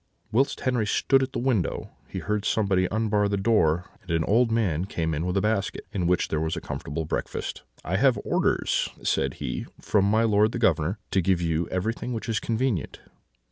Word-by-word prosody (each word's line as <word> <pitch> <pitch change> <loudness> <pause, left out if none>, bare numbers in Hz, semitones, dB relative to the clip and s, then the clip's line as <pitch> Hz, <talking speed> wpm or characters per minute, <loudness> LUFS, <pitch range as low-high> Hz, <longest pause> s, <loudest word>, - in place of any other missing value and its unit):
"Whilst 135 +5 +1
Henri 125 -5 +1
stood 135 +5 +3
at 130 0 -1
the - - -4
window, 120 -8 0 0.2
he - - -7
heard 105 -1 -1
someone 95 -4 +2
unbar 105 -1 +1
the 100 - 0
door; 90 -5 +2 0.2
and 90 - -21
an 80 -1 +1
old 115 +7 +3
man 95 -7 +1
came 80 -4 -2
in 80 +4 -2
with 90 +2 0
a - - +3
basket, 105 -1 -1
in 90 -4 -1
which 90 0 +2
was 80 +1 0
a - - -3
comfortable 80 +2 -4
breakfast. - - -3 0.2
"'I - - 0
have - - +4
orders,' - - +1
said 65 -1 0
he, - - -4
'from 100 -2 +2
my 110 +3 +3
lord 105 0 +3
the - - -2
Governor, 90 -4 +2
to 95 - +3
give 90 0 +2
you 85 -1 0
everything 115 +6 -2
which 115 - -4
is 110 -3 0
convenient.' 115 - -1
100 Hz, 195 wpm, -26 LUFS, 85-115 Hz, 0.2 s, have